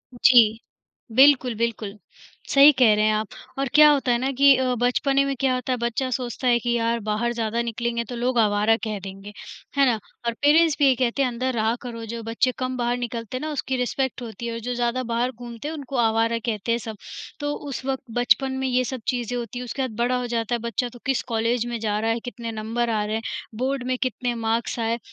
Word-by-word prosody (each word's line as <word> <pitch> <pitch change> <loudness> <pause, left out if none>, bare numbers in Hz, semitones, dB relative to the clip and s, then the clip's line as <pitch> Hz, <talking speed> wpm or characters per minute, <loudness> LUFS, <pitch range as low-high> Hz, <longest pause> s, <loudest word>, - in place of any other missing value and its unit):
जी, 230 -3 +5 0.6
बिल्कुल, 260 -2 +5
बिल्कुल। 220 -2 -3 0.5
सही 280 +2 +8
कह 230 -4 +6
रहे 210 0 +2
हैं 215 - +3
आप 215 0 -1 0.3
और 275 - 0
क्या 300 0 +8
होता 275 -3 +1
है 240 - +3
ना 260 +3 -1
कि 280 0 +7
अ, 255 -1 0
बचपने 275 +3 +2
में 275 0 -1
क्या 265 -2 +2
होता 255 +1 -2
है - - -1
बच्चा 240 +2 -1
सोचता 250 0 -3
है 240 -1 +4
कि 240 +1 -2
यार 230 0 0
बाहर 225 +3 0
ज़्यादा 230 0 -1
निकलेंगे 235 0 -2
तो 245 - -5
लोग 245 +1 -1
आवारा 210 0 +3
कह 215 -2 -3
देंगे, 195 +2 -9 0.4
है 280 - +6
ना? 235 -4 +2 0.3
और 235 - +1
पेरेंट्स 310 +2 +5
भी 290 - +5
यही 265 -2 +5
कहते 250 +2 0
हैं 265 - +2
अंदर 255 +2 -2
रहा 225 0 +1
करो, 230 -2 -7
जो 230 +1 -6
बच्चे 230 +3 +1
कम 255 0 -2
बाहर 240 0 0
निकलते 235 0 -4
हैं - - -6
ना 310 0 -3
उसकी 265 -2 -2
रिस्पेक्ट 255 +1 -2
होती 235 0 -6
है 230 - -3
और 230 - -4
जो - - 0
ज़्यादा 240 +1 0
बाहर 245 +2 0
घूमते 240 +1 -8
हैं, 320 - -4
उनको 275 -2 -7
आवारा 230 0 +2
कहते 225 -1 -2
हैं 230 - +2
सब। 220 -2 -6 0.4
तो 290 0 -2 0.2
उस 265 - -5
वक़्त 270 0 -2 0.2
बचपन 265 +2 +3
में - - +1
ये 255 0 +2
सब 255 -1 -5
चीज़ें 245 -1 -1
होती 240 0 -5
है, 250 - -5
उसके 265 +3 -4
बाद 255 -4 -3
बड़ा 250 +1 +1
हो 250 - -3
जाता 235 0 -1
है - - -3
बच्चा 235 +2 -2
तो 245 - -12
किस 270 -1 0
कॉलेज 230 +1 +1
में 240 -1 -4
जा 210 -1 -1
रहा 225 +1 0
है, 230 - -1
कितने 235 -1 -6
नंबर 225 +2 -2
आ 215 -2 0
रहे 215 +1 -2
हैं, 225 - -2 0.4
बोर्ड 260 +1 -1
में 255 0 0
कितने 250 -1 -2
मार्क्स 230 +1 -1
आए? 230 +1 -1
240 Hz, 240 wpm, -24 LUFS, 230-255 Hz, 0.6 s, सही